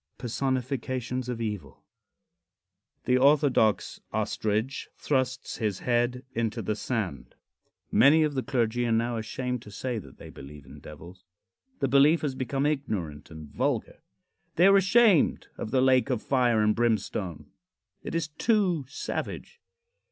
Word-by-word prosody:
V. - - -18
PERSONIFICATIONS 130 0 -2
OF 120 -2 -3
EVIL. 105 - -5 1.2
The 125 0 +3
Orthodox 135 -6 +3
Ostrich 110 +5 -2
Thrusts 130 -2 -1
His 105 -5 -1
Head 120 +1 0
into 115 -2 -2
the 105 - -1
Sand. 95 - -4 0.6
Many 155 +4 +6
of 150 -1 0
the 130 - -1
clergy 120 -2 0
are - - 0
now 115 +1 +1
ashamed 125 +2 -3
to 105 - -12
say 120 +3 -4
that 70 -9 -14
they - - -11
believe 70 +1 -12
in - - -13
devils. 85 +5 -12 0.6
The 135 - +2
belief 140 +5 +5
has 145 -3 -2
become 135 +1 -2
ignorant 100 - -3
and 80 -2 -10
vulgar. - - -2 0.5
They 175 - +5
are 195 0 +7
ashamed 195 -2 +3
of - - -5
the 130 +3 +2
lake 130 0 +3
of 125 -4 -1
fire 120 -5 +2
and 105 0 +3
brimstone. 100 -9 -2 0.5
It - - -6
is 165 -2 0
too 180 - +1
savage. 470 - -6
125 Hz, 145 wpm, -27 LUFS, 110-135 Hz, 1.2 s, are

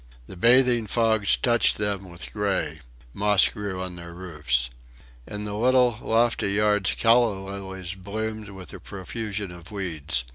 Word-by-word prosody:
The 95 - -11
bathing 120 +2 +4
fogs 110 -1 +2
touched 120 -3 +3
them 100 -2 -2
with 85 0 -9
gray. 95 -7 -1 0.3
Moss 105 0 +5
grew 100 -3 -5
on 90 -1 -6
their 85 0 -9
roofs. 75 -9 -1 0.6
In 105 0 -5
the 105 -1 -5
little, 125 +1 +3
lofty 115 -3 +1
yards 105 -2 +2
calla 115 -2 +4
lilies 95 -2 -6
bloomed 110 +3 -5
with 95 -2 -9
the 95 - -8
profusion 100 +1 -5
of 85 -1 -12
weeds. 80 - -2
100 Hz, 145 wpm, -25 LUFS, 90-110 Hz, 0.6 s, Moss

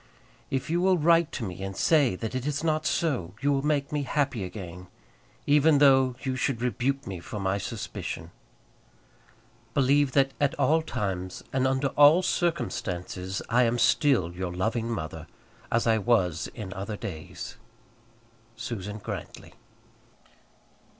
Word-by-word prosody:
If 135 -1 -2
you 175 +1 +2
will 185 0 +4
write 165 0 +4
to 125 - -4
me 95 -3 -6
and 95 0 -5
say 145 - +3
that 110 +5 -5
it 130 +2 -3
is 145 +1 -2
not 155 -1 +1
so, 120 - -1
you 145 - +1
will 135 -1 +1
make 145 -1 0
me 150 -1 0
happy 140 -5 -1
again, 90 -1 -8 0.6
even 150 +1 +5
though 135 -3 +5
you 130 -1 -1
should 130 -1 -1
rebuke 130 +3 -1
me 95 -3 -5
for 105 +5 -7
my 95 +1 0
suspicion. - - -5 1.4
Believe 140 0 +3
that 135 -1 +3
at 145 +2 +2
all 160 0 +3
times, 95 - -4
and 130 0 +2
under 130 +1 +1
all 150 +6 +6
circumstances, 95 - -2
I 120 +2 +3
am 120 0 +2
still 120 - +3
your 90 0 -4
loving 110 +6 -1
mother, 80 -9 -5 0.4
as 115 - +2
I 110 -1 +3
was 95 -7 +1
in 100 -5 -6
other 105 +2 -5
days. 80 -6 -7 1.0
SUSAN 105 -3 -5
GRANTLY. - - -7
125 Hz, 145 wpm, -27 LUFS, 95-145 Hz, 1.4 s, all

